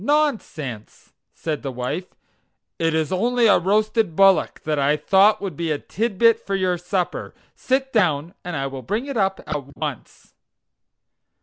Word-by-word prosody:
"Nonsense!" 220 - -2 0.2
said 155 -3 -4
the 135 - -4
wife, 130 +9 -4 0.7
"it 165 -1 +1
is 160 0 0
only 235 +6 +2
a 210 - +6
roasted 210 0 +1
bullock 195 0 +3
that 150 -1 -1
I 145 +2 +2
thought 200 +5 +4
would 190 -6 -4
be 165 +2 -3
a 150 - +1
titbit 230 +5 +2
for 200 - -3
your 185 -2 0
supper; 180 0 -3 0.2
sit 265 +1 -1
down 170 -6 +1
and 175 -1 -5
I 135 -2 -2
will 135 -1 -5
bring 215 - -2
it 280 -2 -5
up 195 -3 0
at 140 -1 -5
once. 145 -6 -7
180 Hz, 160 wpm, -22 LUFS, 150-215 Hz, 0.7 s, a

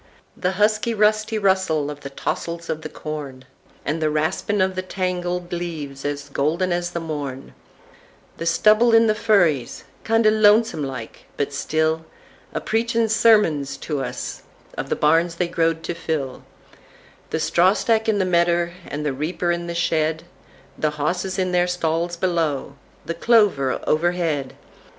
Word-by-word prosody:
The 180 0 -1
husky, 215 +3 +1
rusty 215 +1 +2
russel 190 -7 +1
of 145 - -9
the 140 - -7
tossels 170 +4 -4
of 155 - -4
the - - -6
corn, 140 -4 -7 0.4
And 160 +2 -1
the 155 - +2
raspin' 160 +7 0
of 190 0 +2
the 185 - -2
tangled 180 -1 -3
leaves 155 -6 -5
as 145 0 -3
golden 170 +6 0
as 175 0 -1
the 175 - -4
morn; 145 -5 -5 0.8
The 165 - -4
stubble 215 +7 +5
in 225 0 +6
the 215 - +3
furries—kindo' 210 - +1
lonesome 215 -5 +4
like, 130 -4 -7
but 145 - 0
stillA 155 +3 0 0.6
preachin' 230 0 +1
sermuns 210 -11 +3
to 150 -3 -2
us - - -5 0.3
of - - -5
the - - +1
barns 165 +3 +2
they 175 0 0
growed 165 -1 0
to 160 - -3
fill; 155 -6 -4 0.8
The - - -1
strawstack 210 +7 +2
in 215 - +2
the 190 - +1
medder, 170 -1 +2
and 150 +1 -4
the 145 - 0
reaper 165 +5 -1
in 170 0 -2
the 170 - -4
shed; 160 -1 0 0.6
The 155 - +2
hosses 180 +5 -1
in 185 -1 0
theyr 180 0 +2
stalls 170 0 -1
below—the 165 -3 -3
clover 190 - +3
overhead! 160 -4 0
170 Hz, 145 wpm, -22 LUFS, 155-190 Hz, 0.8 s, in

